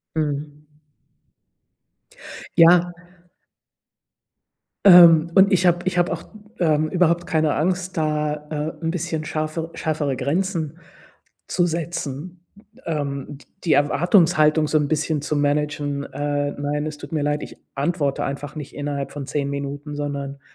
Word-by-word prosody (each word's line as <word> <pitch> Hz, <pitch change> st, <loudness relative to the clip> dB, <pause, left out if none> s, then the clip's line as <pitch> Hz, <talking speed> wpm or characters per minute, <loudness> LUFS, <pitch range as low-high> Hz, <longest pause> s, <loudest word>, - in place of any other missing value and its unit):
Mhm. 150 Hz, -1 st, -3 dB, 1.9 s
Ja 175 Hz, +1 st, +6 dB, 1.9 s
Ähm, 170 Hz, -3 st, +8 dB
und 190 Hz, 0 st, +6 dB
ich 185 Hz, 0 st, +3 dB
habe 175 Hz, 0 st, +3 dB
ich 185 Hz, -1 st, -1 dB
habe 175 Hz, 0 st, +2 dB
auch, -, -, -4 dB, 0.4 s
ähm, 155 Hz, -2 st, +2 dB
überhaupt 175 Hz, -1 st, +1 dB
keine 155 Hz, -2 st, +1 dB
Angst, 180 Hz, +2 st, -1 dB
da, 150 Hz, -1 st, 0 dB, 0.2 s
äh, 155 Hz, -, -4 dB, 0.3 s
'n 165 Hz, -, 0 dB
bisschen 165 Hz, -2 st, -3 dB
scharfer 155 Hz, +1 st, -3 dB
schärfere 150 Hz, -3 st, -1 dB
Grenzen 160 Hz, +2 st, -2 dB, 0.7 s
zu 175 Hz, -, +1 dB
setzen, 170 Hz, +1 st, -5 dB, 0.4 s
ähm, 140 Hz, -4 st, -3 dB
d 140 Hz, -, -19 dB, 0.2 s
die 165 Hz, -, +3 dB
Erwartungshaltung 155 Hz, 0 st, +3 dB
so 155 Hz, -, +2 dB
'n 150 Hz, -, 0 dB
bisschen 155 Hz, 0 st, 0 dB
zu 150 Hz, +1 st, -2 dB
managen: 145 Hz, -1 st, -1 dB
„Äh, 145 Hz, 0 st, -2 dB
nein, 145 Hz, +1 st, -3 dB
es 155 Hz, -1 st, -6 dB
tut 145 Hz, 0 st, -10 dB
mir 155 Hz, -2 st, -1 dB
leid, 150 Hz, 0 st, -1 dB
ich -, -, -10 dB, 0.2 s
antworte 145 Hz, -1 st, -1 dB
einfach 140 Hz, +1 st, -5 dB
nicht 150 Hz, -3 st, -8 dB
innerhalb 145 Hz, -1 st, -4 dB
von 140 Hz, -2 st, -7 dB
10 140 Hz, -1 st, -2 dB
Minuten, 140 Hz, +1 st, -5 dB
sondern“ 140 Hz, -1 st, -5 dB
150 Hz, 135 wpm, -22 LUFS, 145-170 Hz, 1.9 s, Ähm